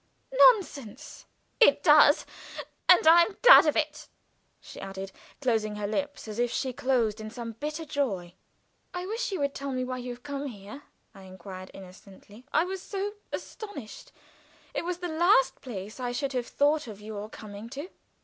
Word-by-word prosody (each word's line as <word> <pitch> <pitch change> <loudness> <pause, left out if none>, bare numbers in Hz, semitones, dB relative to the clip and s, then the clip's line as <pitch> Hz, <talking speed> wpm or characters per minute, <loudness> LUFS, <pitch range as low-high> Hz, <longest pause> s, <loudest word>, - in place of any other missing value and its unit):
"Nonsense!" 310 - +2 0.3
"It 475 - +5
does 295 -2 +6 0.6
And 360 - +7
I 330 +2 +8
am 390 +3 0
glad - - +9
of 300 - +2
it," 300 -1 -2 0.5
she - - -12
added, 195 0 -7 0.3
closing 220 -5 0
her 210 0 -4
lips 285 +6 -3
as 215 +1 -6
if 240 0 +2
she 260 +2 -2
closed 235 -4 0
in 215 - -6
some 230 0 -7
bitter 300 +8 -5
joy. 200 - -2 0.6
"I 360 0 -4
wish 450 +4 -3
you 380 - -3
would 280 0 0
tell 275 0 -5
me 255 -1 -2
why 255 0 -4
you 250 0 -6
have 245 +1 -10
come 285 0 -4
here," 210 +3 -10 0.3
I 195 - -14
inquired, 185 0 -10
innocently. 195 +5 -14
"I - - +3
was 375 +1 -5
so 400 +1 -4 0.2
astonished. 405 - -8 0.6
It - - -3
was 355 0 -2
the 355 0 -4
last 315 -5 +3
place 215 -2 -8
I 245 -1 -3
should 275 +2 -2
have 245 -2 -2
thought 295 0 +1
of 210 -3 -9
your 210 0 -7
coming 210 +1 -10
to." 285 +8 -7
255 Hz, 175 wpm, -28 LUFS, 215-310 Hz, 0.6 s, glad